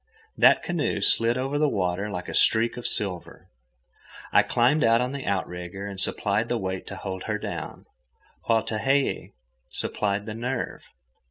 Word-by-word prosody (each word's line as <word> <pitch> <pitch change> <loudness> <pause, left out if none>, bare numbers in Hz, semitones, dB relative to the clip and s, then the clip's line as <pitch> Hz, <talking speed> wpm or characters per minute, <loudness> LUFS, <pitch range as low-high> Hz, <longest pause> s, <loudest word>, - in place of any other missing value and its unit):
That - - +5
canoe 165 -11 -1
slid 115 +4 +3
over 135 +3 -2
the 150 -1 +3
water 95 -1 -1
like 90 -3 -5
a - - -6
streak 115 +1 +3
of 120 - -3
silver. 95 -4 +1 0.8
I - - +7
climbed 125 +6 +2
out 115 0 +4
on 125 +1 -1
the 140 -1 -6
outrigger 95 0 -4
and 100 -2 -5
supplied 105 +3 +1
the 120 - 0
weight 95 -3 -4
to - - -6
hold 95 -1 -6
her - - -1
down, - - -7 0.6
while 115 -1 +2
Tehei 135 +6 +1
(pronounced - - 0
Tayhayee) - - -14 0.4
supplied 100 0 -2
the 110 - -5
nerve. 120 +3 -4
110 Hz, 170 wpm, -25 LUFS, 95-125 Hz, 0.8 s, I